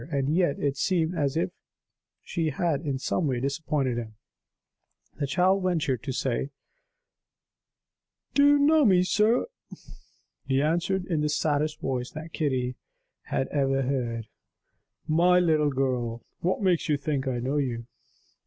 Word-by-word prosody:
And 140 0 0
yet, 175 -6 +2
it 140 -1 -1
seemed 170 -1 +1
as 145 -5 -1
if 90 - 0 0.7
she 165 -2 -1
had 150 0 -1
in 140 -4 -2
some 150 +4 -1
way 130 -3 0
disappointed 140 -2 -1
him. 110 -2 -8 1.0
The 140 - 0
child 190 +5 +2
ventured 160 - 0
to 140 - -4
say: 130 +1 -1 1.8
"Do 285 - +4
you 290 0 +6
know 300 +2 +4
me, 185 -6 +5
sir?" 215 +6 +2 1.0
He 135 0 +2
answered 175 +5 0
in 165 -5 -1
the 150 - +1
saddest 150 0 0
voice 125 -2 -2
that 160 +1 -8
Kitty 130 -4 -1 0.5
had 135 - -1
ever 135 -2 +1
heard: 120 -4 -2 0.8
"My 175 +3 +4
little 155 -4 +3
girl, 125 -4 -2
what 185 +4 -1
makes 180 -5 +2
you 150 - +3
think 140 -2 -2
I 130 -2 -1
know 130 +5 -1
you?" 120 -5 -2
145 Hz, 145 wpm, -27 LUFS, 130-170 Hz, 1.8 s, you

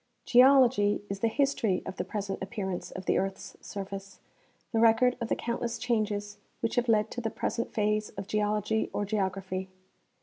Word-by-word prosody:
Geology 250 -5 +5
is 195 - -3
the 230 - +2
history 230 -6 +1
of 190 - -6
the - - -1
present 200 -2 -4
appearance 190 -3 -4
of 190 - -8
the - - +2
earth's 195 0 -4
surface, 195 -1 -7 0.5
the 225 - +1
record 230 +2 +5
of 235 - -1
the - - +2
countless 235 0 -3
changes 210 -4 -1 0.2
which 230 - -1
have 245 -1 +1
led 215 -1 +3
to 245 - -4
the 225 - -1
present 230 - -3
phase 210 0 0
of 195 - -4
geology 210 +1 0
or 205 - -1
geography. 190 -2 -2
210 Hz, 170 wpm, -29 LUFS, 195-230 Hz, 0.5 s, Geology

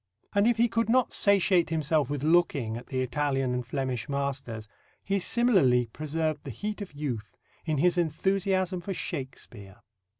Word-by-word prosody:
And, 200 +2 +3
if 240 -1 +3
he 235 +1 +4
could 230 0 0
not 255 +1 +3
"satiate 190 -4 +3
himself 155 -2 +1
with 145 -1 -3
looking" 155 -8 +2
at 120 - -8
the 130 -1 -2
Italian 135 -1 -1
and 125 0 -2
Flemish 130 -1 -3
masters, 135 -6 -3 0.4
he 200 0 0
similarly 185 - +3
preserved 155 0 -2
the - - -7
heat 210 - -5
of 195 -6 -7
youth 120 -9 -5 0.3
in 155 -3 0
his 175 +4 +3
enthusiasm 185 +2 0
for 190 +2 -4
Shakespeare. 120 - -6
150 Hz, 160 wpm, -28 LUFS, 130-190 Hz, 0.4 s, he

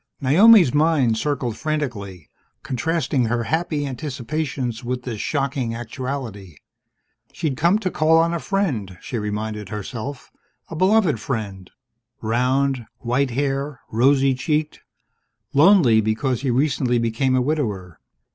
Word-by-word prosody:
Naomi's 175 - +6
mind 150 -6 +3
circled 125 -2 -2
frantically, 115 - -4 0.4
contrasting 150 -1 -1
her 120 +1 -1
happy 155 +1 -1
anticipations 135 -2 -4
with 125 +1 -3
this 115 -5 -5
shocking 135 -5 -2
actuality. 115 - -6 0.8
She'd 155 -6 -2
come 170 +8 +3
to 190 -4 -3
call 160 +1 +3
on 165 +1 +2
a 170 - -1
friend, 135 - -2
she 120 - -5
reminded 105 -1 -4
herself, 115 +6 -6 0.4
a 165 - -6
beloved 185 - +3
friend 105 -6 -5 0.5
round, 125 +2 0
white 125 +3 0
haired, 140 +2 -2
rosy 135 +4 +3
cheeked; 150 +3 -2 0.7
lonely 145 - +5
because 115 +4 -1
he'd 135 - -1
recently 130 -1 +1
become 120 +3 0
a 130 - +3
widower. 105 - -2
130 Hz, 120 wpm, -22 LUFS, 115-150 Hz, 0.8 s, Naomi's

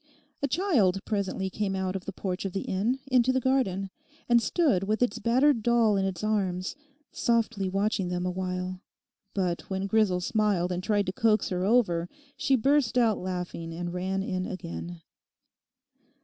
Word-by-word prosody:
A 280 - +1
child 265 - +2
presently 195 -2 -2
came 200 -1 -2
out 190 0 -2
of 190 - -5
the - - -4
porch 185 -1 -4
of 195 -2 -4
the 195 - -2
inn 215 +7 0
into 250 0 +4
the 260 - +1
garden, 205 -8 0 0.4
and 240 -1 +5
stood 230 - +2
with 215 +4 +1
its 245 - -1
battered 250 +3 +3
doll 230 -2 +3
in 195 -1 +1
its 190 0 -3
arms, 190 -3 -1 0.4
softly 230 -4 0
watching 195 0 0
them 180 0 -2
awhile. 180 0 -3 0.5
But 180 -3 -1
when 190 0 -2
Grisel 200 -3 +2
smiled 190 -2 +1
and 180 0 -2
tried 205 -1 +1
to 185 - -3
coax 215 +1 +2
her 180 -1 -1
over, 185 -6 +2 0.3
she 270 - +2
burst 265 0 +2
out 230 -4 +3
laughing 180 -2 -4
and 175 0 -4
ran 190 +2 -1
in 185 -1 -2
again. 85 - -7
195 Hz, 165 wpm, -28 LUFS, 185-230 Hz, 0.5 s, and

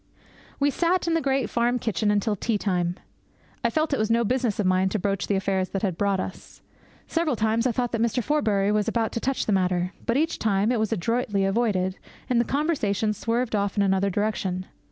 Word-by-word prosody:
We 285 0 +3
sat 345 +4 +1
in 335 - +2
the 330 - +2
great 270 -4 +1
farm 240 +2 +1
kitchen 220 -2 -1
until 205 +1 +1
tea 215 +2 -1
time. 180 -4 -1 0.7
I - - +3
felt 310 -2 0
it - - 0
was 215 0 0
no 230 +1 +3
business 240 -2 0
of 205 - +1
mine 185 +1 +3
to 215 - -1
broach 195 0 -1
the 200 - +1
affairs 190 -1 0
that 195 - -3
had 190 -4 0
brought 200 +1 +1
us. 185 - -7 0.4
Several 330 -5 0
times 225 +2 +1
I - - +1
thought 245 +1 -1
that 230 - -1
Mr. 235 +1 +1
Forbury 210 -8 +1
was 210 -1 +1
about 225 -2 0
to - - -2
touch 270 +3 -1
the - - 0
matter. 180 -1 +1
But 235 - +2
each 320 +3 0
time 205 +1 +1
it 245 - +1
was 220 0 0
adroitly 210 0 0
avoided, 195 -3 0 0.3
and 240 -1 +4
the - - -1
conversation 225 - 0
swerved 230 +2 -1
off 200 0 -1
in 200 - +4
another 195 0 +2
direction. 190 -2 -1
215 Hz, 215 wpm, -25 LUFS, 195-245 Hz, 0.7 s, and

